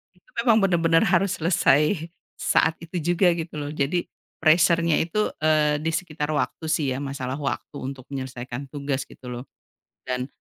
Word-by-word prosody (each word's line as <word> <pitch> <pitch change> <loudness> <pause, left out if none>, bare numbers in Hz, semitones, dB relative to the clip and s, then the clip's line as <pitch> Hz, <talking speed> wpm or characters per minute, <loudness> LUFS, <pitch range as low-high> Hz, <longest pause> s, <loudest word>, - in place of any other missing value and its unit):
itu - - -29
memang 230 -4 +5
benar-benar 165 -3 +3
harus 190 +1 +2
selesai 160 0 +2 0.3
saat - - +3
itu 170 +2 -6 0.2
juga 180 +1 +4
gitu 165 0 -5
loh. 145 - -4
Jadi 155 +4 -1 0.3
pressure-nya 165 0 +4
itu, 210 +6 0 0.2
eee, 155 -1 +3
di 160 +1 0
sekitar 155 -3 -3
waktu 150 +2 -2
sih 150 -3 +1
ya, - - -3
masalah 135 -2 -4
waktu 140 -4 -4
untuk 130 -1 -6
menyelesaikan 130 -1 -5
tugas 140 -2 -2
gitu 130 - -14
loh. 120 0 -5 0.6
Dan, 125 0 -2
155 Hz, 155 wpm, -24 LUFS, 135-170 Hz, 0.6 s, memang